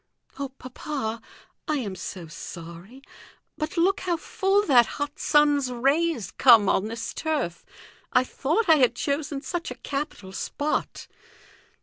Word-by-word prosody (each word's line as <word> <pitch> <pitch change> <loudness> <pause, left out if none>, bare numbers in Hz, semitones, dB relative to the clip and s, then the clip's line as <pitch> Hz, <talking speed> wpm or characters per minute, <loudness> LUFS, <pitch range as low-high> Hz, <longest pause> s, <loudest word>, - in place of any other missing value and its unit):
"Oh, 280 -1 -3
papa! 250 -3 -5 0.5
I 305 - +1
am 215 -8 -3
so 185 -2 -7
sorry. 170 - -10 0.5
But 310 +3 -4
look 380 +4 +3
how 355 -3 -1
full 390 +4 +1
that 245 - +6
hot 290 0 -4
sun's 290 -3 +3
rays 275 - +1
come 230 -6 +7
on 195 +2 +2
this 230 +1 -5
turf. 290 - -2 0.5
I 250 - +4
thought 320 - -1
I 320 -2 +7
had 255 -4 +3
chosen 280 -1 -2
such 340 +5 -3
a - - -6
capital 275 -9 -5
spot!" 290 +10 -3
275 Hz, 135 wpm, -25 LUFS, 230-310 Hz, 0.5 s, come